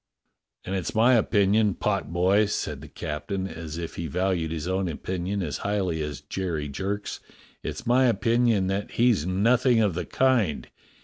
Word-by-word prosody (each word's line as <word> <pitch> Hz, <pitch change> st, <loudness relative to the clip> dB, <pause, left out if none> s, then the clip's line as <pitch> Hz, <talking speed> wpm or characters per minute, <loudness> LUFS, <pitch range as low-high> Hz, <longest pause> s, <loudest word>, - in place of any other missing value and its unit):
"And 95 Hz, -, -4 dB
it's 95 Hz, +1 st, -3 dB
my 120 Hz, +4 st, +5 dB
opinion, 105 Hz, -3 st, +3 dB
potboy," 90 Hz, +7 st, +1 dB
said -, -, -3 dB
the -, -, -10 dB
captain, 95 Hz, +6 st, -4 dB
as 80 Hz, -2 st, -7 dB
if 85 Hz, -1 st, -6 dB
he 85 Hz, -, -3 dB
valued 90 Hz, 0 st, 0 dB
his 80 Hz, 0 st, -4 dB
own 95 Hz, 0 st, 0 dB
opinion 95 Hz, +4 st, -3 dB
as 75 Hz, -6 st, -3 dB
highly 95 Hz, -6 st, -1 dB
as 75 Hz, -2 st, -4 dB
Jerry 85 Hz, -6 st, -3 dB
Jerk's, 100 Hz, +8 st, -4 dB, 0.4 s
"it's -, -, -6 dB
my 125 Hz, +2 st, +4 dB
opinion 115 Hz, -4 st, +2 dB
that 95 Hz, +2 st, -2 dB
he's 115 Hz, -9 st, +2 dB
nothing 120 Hz, +6 st, +3 dB
of 105 Hz, -5 st, +2 dB
the 90 Hz, -, -3 dB
kind. 110 Hz, -, +1 dB
95 Hz, 160 wpm, -26 LUFS, 85-110 Hz, 0.4 s, my